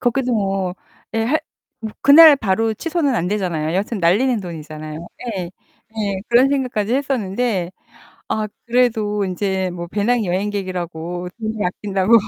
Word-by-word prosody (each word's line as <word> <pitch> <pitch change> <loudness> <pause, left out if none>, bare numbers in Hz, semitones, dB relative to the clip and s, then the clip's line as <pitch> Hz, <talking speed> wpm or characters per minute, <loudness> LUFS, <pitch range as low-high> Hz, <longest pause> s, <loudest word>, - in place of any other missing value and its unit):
거기도 250 0 +1
뭐 195 -4 0 0.4
예 225 0 +1
할 295 +7 +1 0.4
뭐 220 -2 -5
그날 295 +1 +9
바로 220 0 0
취소는 310 - -1
안 180 -5 0
되잖아요. 175 -6 -1
여하튼 205 +4 -1
날리는 215 +8 +3
돈이잖아요. 155 -2 -7 0.3
예. 185 - -2 0.5
예. 200 -3 -1
그런 245 +3 +5
생각까지 250 -5 0
했었는데 235 -8 -1 0.6
아 215 -1 -1 0.2
그래도 220 -4 +1
인제 190 0 -1
뭐 175 -1 -6
배낭여행객이라고 185 -5 -2
돈을 220 -1 -3
아낀다고 195 +3 +1
205 Hz, 310 characters per minute, -20 LUFS, 180-240 Hz, 0.6 s, 그날